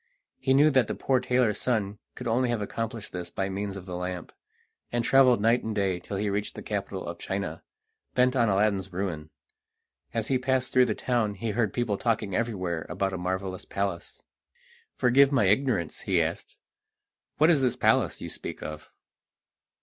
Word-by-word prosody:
He 130 -1 +2
knew 150 +3 +6
that 130 -5 +3
the - - -3
poor 130 -2 +1
tailor's 125 -4 +1
son 105 -5 -1 0.2
could 125 - -6
only 120 +2 +2
have 120 -2 0
accomplished 110 +1 -4
this 90 -1 -5
by 95 0 -2
means 100 0 -3
of 95 - -9
the 90 -2 -6
lamp, 90 -1 -5 0.6
and 120 0 0
travelled 130 -3 +5
night 115 +3 +3
and 110 -1 -3
day 95 -3 0
till 100 +3 -5
he 105 +2 -1
reached 100 +1 -2
the - - -7
capital - - -4
of - - -6
China, - - -4 0.5
bent 125 +1 +3
on 120 -4 +3
Aladdin's 100 -1 +1
ruin. 90 -5 -3 0.8
As 115 -1 -2
he 130 -2 +2
passed 130 0 0
through 125 -1 +5
the 110 - -1
town 115 -5 0
he 110 +3 -3
heard 110 -2 +1
people 115 -5 -1
talking 110 -4 0
everywhere 95 -8 -2
about 95 +2 -1
a - - -2
marvellous 95 +1 -3
palace. 100 -3 -4 0.7
"Forgive 135 +3 +5
my 130 -7 +3
ignorance," 105 - +1
he - - +1
asked, - - -3 0.8
"what 155 +3 +6
is 150 -5 +3
this 125 -2 +2
palace - - +2
you - - -5
speak - - -7
of?" 75 0 -7
105 Hz, 180 wpm, -27 LUFS, 95-125 Hz, 0.8 s, knew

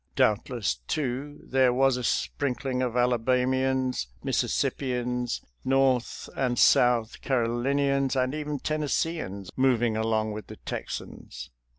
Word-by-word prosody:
Doubtless, 105 - +1
too, 145 +1 -3
there 130 -1 +3
was 135 +1 +3
a 125 - -4
sprinkling 130 +1 -1
of 125 -1 -1
Ala 125 -1 +3
bamians, 130 - +1 0.2
Mississippians, 125 -2 -1 0.2
North 130 -2 +1
and 125 -2 0
South 120 -2 +4
Caro 125 -4 +1
linians, 140 +2 +1
and 130 0 +1
even 150 -1 -3
Tennesseeans, 150 - -2
moving 120 -4 +2
along 110 -1 0
with 105 -1 -7
the - - -9
Texans. - - -6
125 Hz, 115 wpm, -27 LUFS, 120-135 Hz, 0.2 s, South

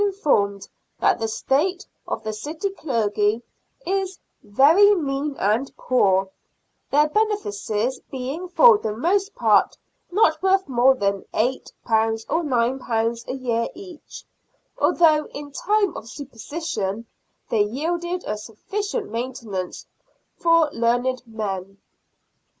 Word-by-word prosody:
informed 275 - +1 0.3
that - - +3
the 225 - -1
state 310 - 0 0.2
of - - -4
the 215 - -3
city 310 - -4
clergy 220 - 0 0.3
" - - -34 0.2
is 380 0 -6 0.2
very 315 - +5
mean 285 -3 -2
and 220 +7 0
poor," 195 -6 +2 0.6
their 295 +2 +4
benefices 260 - -1
being 270 +7 -5
for 450 +3 +7
the 215 -1 -4
most 390 - 0
part - - +3 0.3
not 320 -5 +3
worth 385 0 +2
more 260 0 +4
than 200 -4 -1
£8 250 +4 -1 0.6
or 330 - +1
£g 235 -3 0
a - - -3
year 235 -3 -1
each, 365 -4 -11 0.5
although 320 -10 +3
in 290 0 -9
time 405 +4 +1
of 225 - -8
superstition 240 - -5 0.4
they 220 - +2
yielded 340 - -2
a 210 - -2
sufficient 400 - -4
maintenance 230 -6 -5 0.5
for 335 -2 +4
learned 245 +2 0
men. 195 -3 -5
265 Hz, 115 wpm, -23 LUFS, 225-345 Hz, 0.6 s, for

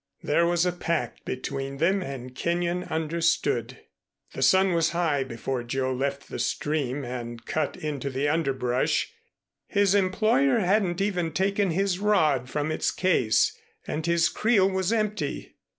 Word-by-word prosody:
There 170 +3 +2
was 175 0 +2
a 180 - +2
pact 170 -7 -3
between 135 +1 -4
them 190 +6 +2
and 130 -6 -6
Kenyon 175 +5 -1
understood. 165 +1 -1 0.5
The - - -6
sun 190 -1 +4
was 165 -1 +2
high 155 -6 +1
before 130 0 -4
Joe 130 +2 -2
left 140 +2 -3
the - - -6
stream 145 -3 -1
and 120 -1 -6
cut 155 -2 -2
into 145 -3 -3
the 135 +2 -1
underbrush. 135 -5 0 0.6
His 200 -1 +2
employer 220 +7 +3
hadn't 195 -2 +1
even 180 -5 -1
taken 195 +1 +1
his 185 +2 0
rod 155 - +2
from 150 +3 -2
its - - 0
case, 165 -12 +2 0.3
and 155 - -3
his 170 0 +3
creel 215 -4 +3
was 190 0 0
empty. 215 -2 -2
165 Hz, 145 wpm, -26 LUFS, 135-190 Hz, 0.6 s, sun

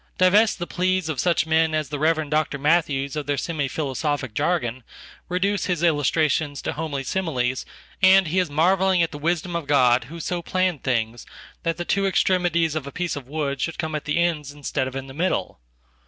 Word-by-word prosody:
Divest 205 +4 +4
the 175 - -3
pleas 185 -1 0
of 150 -5 -3
such 170 +1 +2
men 160 0 +2
as 155 -3 -1
the 145 -1 -4
Rev. 155 0 +1
Dr. 155 -1 +1
Matthews 145 -2 +1
of 150 -2 -4
theirsemi 145 0 -1
philosophic 140 -3 -2
jargon, 130 -5 -1 0.5
reduce 190 +2 0
his 175 -2 -1
illustrations 150 -2 +1
to - - -2
homelysimiles, 140 -3 -2 0.4
and 190 -1 +6
he 185 +4 +1
is 180 -3 0
marvelling 185 +4 +3
at 165 - -1
the 145 - -7
wisdom 170 +2 -1
of 170 -4 -3
God 130 -4 +4
who 165 +7 -9
so 175 +2 -3
plannedthings 130 -11 -1 0.3
that 165 -1 -1
the 175 - -4
two 195 +2 +1
extremities 175 -4 +2
of 155 -3 -4
a - - -6
Piece 175 +1 -2
of 140 -3 -8
wood 140 -2 -3
should 165 - -2
come 160 -2 -3
atthe 150 0 -2
ends 165 -5 0
instead 145 -2 -3
of 130 - -7
in 135 0 -4
the 135 - -10
middle. 170 - -1
155 Hz, 185 wpm, -23 LUFS, 140-175 Hz, 0.5 s, and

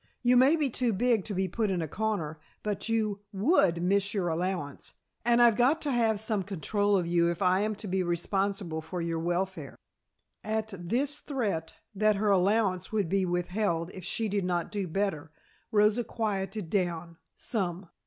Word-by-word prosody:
"You 245 0 +5
may 265 +5 +6
be 305 -3 +1
too 245 -2 0
big 230 0 +2
to 205 - -4
be 190 +1 0
put 215 +3 -1
in 185 -2 0
a 160 - -2
corner, 170 -5 -2 0.2
but 210 +1 -3
you 215 -3 0
would 195 - +2
miss 200 +2 +2
your 180 -4 0
allowance, 170 -3 -3 0.3
and 240 0 +3
I've 235 -2 +6
got 255 +7 +3
to 290 - 0
have 225 -4 +2
some 215 -1 0
control 205 +2 0
of 180 - 0
you 170 0 +2
if 170 +3 -2
I 185 +1 +4
am 215 +1 0
to 210 - -7
be 190 0 0
responsible 180 0 -1
for 160 +3 -6
your 165 -1 -2
welfare." 180 +3 -2 0.7
At 220 0 -2
this 250 - -1
threat, 210 - -3 0.2
that 215 +1 +3
her 205 +1 +1
allowance 195 -1 +2
would 205 -6 0
be 195 +1 +2
withheld 175 -1 -1
if 185 - -9
she 225 +5 -2
did 200 -1 -1
not 175 -2 -1
do 200 -3 -2
better, 160 -4 -2 0.4
Rosa 210 +2 +3
quieted 205 -5 -3
down 170 -3 -1 0.2
some. 190 -4 -3
195 Hz, 180 wpm, -29 LUFS, 175-220 Hz, 0.7 s, may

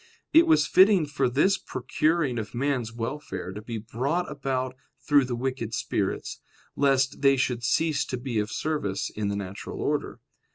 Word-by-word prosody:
It 330 +2 +7
was 320 -1 +5
fitting 190 -3 +5
for 140 -3 0
this 185 +10 +2
procuring 145 0 0
of 110 +2 -6
man's 125 -3 -1
welfare 115 -3 -5
to 105 +3 -7
be 115 +1 -5
brought 130 +11 -2
about 130 -3 -2 0.2
through 145 -2 +3
the 125 -1 -3
wicked 120 -2 -3
spirits, - - -2 0.4
lest 135 -2 +2
they 135 -1 +5
should 125 -2 -1
cease 150 +3 +1
to 125 - -4
be 120 -3 -2
of 105 0 -2
service 110 -10 -2
in 105 -1 -3
the 100 - -1
natural 100 -1 -6
order. - - -2
130 Hz, 165 wpm, -26 LUFS, 115-150 Hz, 0.4 s, It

